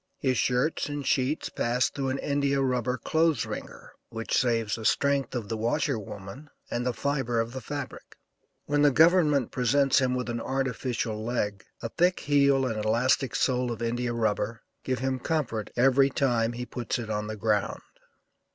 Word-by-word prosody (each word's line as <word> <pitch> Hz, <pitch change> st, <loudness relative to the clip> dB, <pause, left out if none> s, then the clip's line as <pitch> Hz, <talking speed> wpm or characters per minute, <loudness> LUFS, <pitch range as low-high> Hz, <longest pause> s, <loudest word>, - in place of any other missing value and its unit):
His 130 Hz, -2 st, 0 dB
shirts 125 Hz, +5 st, +1 dB
and 145 Hz, -1 st, -4 dB
sheets 135 Hz, +3 st, 0 dB
pass 125 Hz, +2 st, +1 dB
through 135 Hz, -2 st, -3 dB
an 130 Hz, -, -1 dB
India 140 Hz, -1 st, 0 dB
rubber 125 Hz, -2 st, 0 dB
clothes 160 Hz, -3 st, +1 dB
wringer, -, -, -8 dB, 0.2 s
which 115 Hz, 0 st, -3 dB
saves 115 Hz, -4 st, +1 dB
the 115 Hz, -, -3 dB
strength 140 Hz, +2 st, +1 dB
of 115 Hz, -4 st, -3 dB
the 115 Hz, -, -2 dB
washer 120 Hz, +3 st, 0 dB
woman 100 Hz, +8 st, -9 dB, 0.2 s
and 120 Hz, -, -1 dB
the -, -, +2 dB
fibre 130 Hz, -3 st, -1 dB
of 115 Hz, +1 st, -2 dB
the 130 Hz, -, -5 dB
fabric. 145 Hz, +4 st, -7 dB, 0.5 s
When 145 Hz, 0 st, +1 dB
the 145 Hz, -, +6 dB
government 150 Hz, -3 st, +4 dB
presents 135 Hz, +2 st, +3 dB
him 130 Hz, -1 st, +1 dB
with 125 Hz, -2 st, -2 dB
an 120 Hz, -1 st, -3 dB
artificial 125 Hz, -4 st, -2 dB
leg, 105 Hz, -4 st, -2 dB, 0.2 s
a 115 Hz, -, -2 dB
thick 180 Hz, +7 st, +1 dB
heel 140 Hz, -2 st, +3 dB
and 110 Hz, -4 st, -2 dB
elastic 120 Hz, +3 st, +1 dB
sole 125 Hz, -2 st, +1 dB
of 115 Hz, 0 st, -4 dB
India 120 Hz, +1 st, -1 dB
rubber 115 Hz, 0 st, -1 dB, 0.2 s
give 130 Hz, -1 st, -1 dB
him 130 Hz, 0 st, -1 dB
comfort 120 Hz, -8 st, -2 dB
every 135 Hz, +2 st, +4 dB
time 120 Hz, -4 st, +1 dB
he 125 Hz, +1 st, -5 dB
puts 120 Hz, -1 st, -3 dB
it 115 Hz, -3 st, -5 dB
on 105 Hz, 0 st, -2 dB
the 110 Hz, 0 st, -5 dB
ground. 105 Hz, -2 st, 0 dB
125 Hz, 175 wpm, -27 LUFS, 115-140 Hz, 0.5 s, the